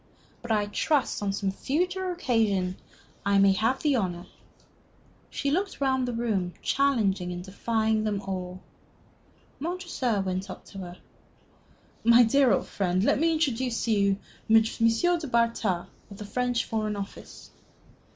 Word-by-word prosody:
But 240 - -5
I 210 -1 +2
trust, 265 +6 0
on 200 -1 0
some 195 0 -1
future 360 - -1
occasion, 220 - 0 0.5
I 200 0 +2
may 195 0 +6
have 225 +7 0
the 295 -3 +3
honor 180 -4 -2 0.6
" - - -34 0.3
She 280 - -2
looked 385 +6 -1
round 260 -2 +1
upon 230 -1 -3
them, 185 -5 -1
challenging 210 -10 +1
and 175 0 -5
defying 220 +3 0
them 210 -2 -1
all. 185 -1 -5 1.0
Montresor 315 - -2
went 190 +1 -3
up 185 - -9
to 195 - -7
her. 180 -1 -8 1.1
"My 235 +1 +7
dear 260 +2 +4
old - - +2
friend, 185 -1 0
let 235 - +3
me 330 +2 +3
introduce 260 -7 0
to 230 - 0
you 200 -2 +2 0.3
M. 220 0 +7
du 260 +10 +1
Bartas, 230 -7 +1 0.2
of 200 - -11
the 210 - -7
French 245 +2 -1
Foreign 215 -1 -2
Office." 200 -1 -9
220 Hz, 150 wpm, -27 LUFS, 195-260 Hz, 1.1 s, My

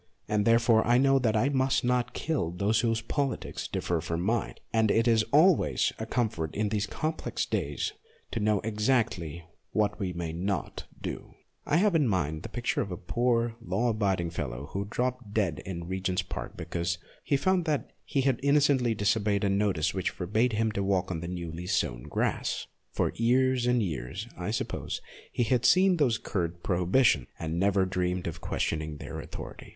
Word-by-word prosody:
And 105 -1 +1
therefore 115 -1 +5
I 120 +1 +5
know 135 +1 +4
that 115 -4 +1
I 125 +6 +3
must 135 -1 +2
not 125 0 0
kill 150 - -1
those 100 +5 +1
whose 115 0 +1
politics 135 +4 -2
differ 85 -2 -1
from 85 0 -2
mine; 110 +5 0 0.2
and 110 -1 +3
it 115 +3 +3
is 115 -1 +5
always 160 +4 +4
a 110 - -4
comfort 105 -11 -1
in 105 0 0
these 105 -1 -1
complex 155 +8 -2
days - - -2 0.4
to 115 - -2
know 105 -1 +2
exactly 105 - 0 0.3
what 105 0 +1
we 95 -3 -1
may 85 -2 -4
not 90 -1 -3
do. - - -6 0.3
I 150 - +3
have 200 +2 +3
in 155 -5 +3
my 95 -7 +2
mind 80 0 -6
the - - -7
picture 120 0 -1
of 100 - -3
a 90 - -4
poor, 120 +4 0
law 120 +1 0
abiding 95 -6 0
fellow 65 -3 -5
who 100 +1 -2
dropped 125 -2 -2
dead 95 -8 +1
in 85 -3 -4
Regent's 95 0 -1
Park 90 - -6
because 85 0 -2 0.3
he 140 - +2
found 185 +4 +2
that 150 -4 -1
he 135 - 0
had 130 -2 +1
innocently 140 -4 +3
disobeyed 100 -1 +1
a 100 - +2
notice 95 -5 +1
which 95 -2 0
forbade 110 +7 0
him 110 +1 +1
to 100 - -2
walk 95 -2 +1
on 85 - -2
the 85 - -5
newly 85 -1 -5
sown - - 0
grass. - - -1 0.3
For - - 0
years 125 +1 +3
and 125 -2 +3
years, 85 - -4
I 90 +2 -4
suppose, 110 - -3 0.3
he - - +1
had 120 +1 +1
seen 185 +8 +5
those 130 -8 +3
curt 85 -5 -3
prohibitions, 90 - +3
and 80 +1 -3
never 100 0 +3
dreamed 90 -1 -1
of 85 -1 -5
questioning 80 -1 -2
their - - -7
authority. - - -8
105 Hz, 185 wpm, -29 LUFS, 90-120 Hz, 0.4 s, therefore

